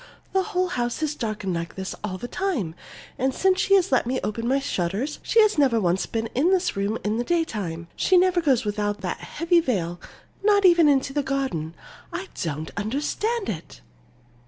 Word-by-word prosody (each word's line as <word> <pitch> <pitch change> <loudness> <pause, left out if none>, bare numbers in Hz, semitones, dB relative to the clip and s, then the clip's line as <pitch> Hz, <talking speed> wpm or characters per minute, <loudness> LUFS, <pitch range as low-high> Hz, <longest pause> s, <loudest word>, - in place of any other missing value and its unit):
The 385 - +3
whole 370 -2 -1
house 240 0 -2
is 305 -1 0
darkened 215 -7 -3
like 170 -1 -4
this 190 0 -4
all 190 -3 -3
the 245 - -6
time, 265 - -2 0.5
and 265 +1 +1
since 375 -1 +2
she 395 0 +5
let - - +3
me 260 +1 0
open 230 +2 -2
my 265 +2 +3
shutters, 220 - -2
she's 430 -6 +3
never 260 -5 +4
once 180 -1 +1
been 225 0 -2
in 290 +8 +3
this 375 -1 +1
room 200 +3 -1
in 210 +2 0
the 240 - 0
daytime. 210 - -2
She 375 - +3
never 360 -1 +4
goes 270 -7 +3
out - - -10
without 205 -1 -1
that 180 - -3
heavy 340 +2 +1
veil, 180 - -2 0.4
not 405 -1 +4
even 340 -4 +6
into 270 -1 +2
the 290 - +1
garden. 265 - -2 0.4
I 380 +1 -5
don't 155 -1 -3
understand 300 - -1
it!" 155 - -6
255 Hz, 185 wpm, -24 LUFS, -, 0.5 s, even